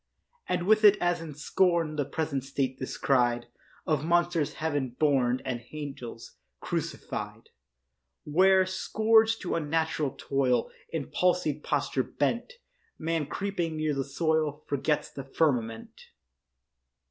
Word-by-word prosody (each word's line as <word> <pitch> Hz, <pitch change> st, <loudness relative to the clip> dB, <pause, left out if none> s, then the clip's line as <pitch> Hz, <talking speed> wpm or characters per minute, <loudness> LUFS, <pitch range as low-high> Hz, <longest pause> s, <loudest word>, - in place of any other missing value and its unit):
And 180 Hz, -1 st, 0 dB
with 215 Hz, +2 st, +4 dB
it 210 Hz, -1 st, +8 dB
as 175 Hz, -1 st, +1 dB
in 155 Hz, -3 st, -8 dB
scorn 165 Hz, +1 st, +1 dB
The 145 Hz, -2 st, 0 dB
present 145 Hz, -4 st, -2 dB
state 135 Hz, -1 st, -2 dB
descried 120 Hz, -2 st, +1 dB, 0.4 s
Of 155 Hz, -4 st, +1 dB
monsters 170 Hz, -2 st, +1 dB
heaven 145 Hz, -6 st, -2 dB
born 130 Hz, -4 st, +2 dB
And 120 Hz, -2 st, -3 dB
angels 135 Hz, -6 st, -8 dB, 0.2 s
crucify'd, -, -, -4 dB, 0.7 s
Where, 190 Hz, +4 st, +4 dB
scourged 220 Hz, +4 st, +3 dB
to 180 Hz, -, -2 dB
unnatural 160 Hz, -2 st, -1 dB
toil, 130 Hz, -4 st, +1 dB, 0.2 s
In 155 Hz, -4 st, -4 dB
palsy'd 175 Hz, -5 st, +1 dB
posture 140 Hz, -2 st, 0 dB
bent, 235 Hz, -, -2 dB, 0.4 s
Man 165 Hz, -2 st, -1 dB
creeping 175 Hz, -3 st, -2 dB
near 155 Hz, -1 st, 0 dB
the 135 Hz, -1 st, -1 dB
soil 155 Hz, +1 st, 0 dB
Forgets 145 Hz, +2 st, 0 dB
the 135 Hz, -, -7 dB
firmament. 125 Hz, -6 st, -1 dB
155 Hz, 120 wpm, -28 LUFS, 135-175 Hz, 0.7 s, it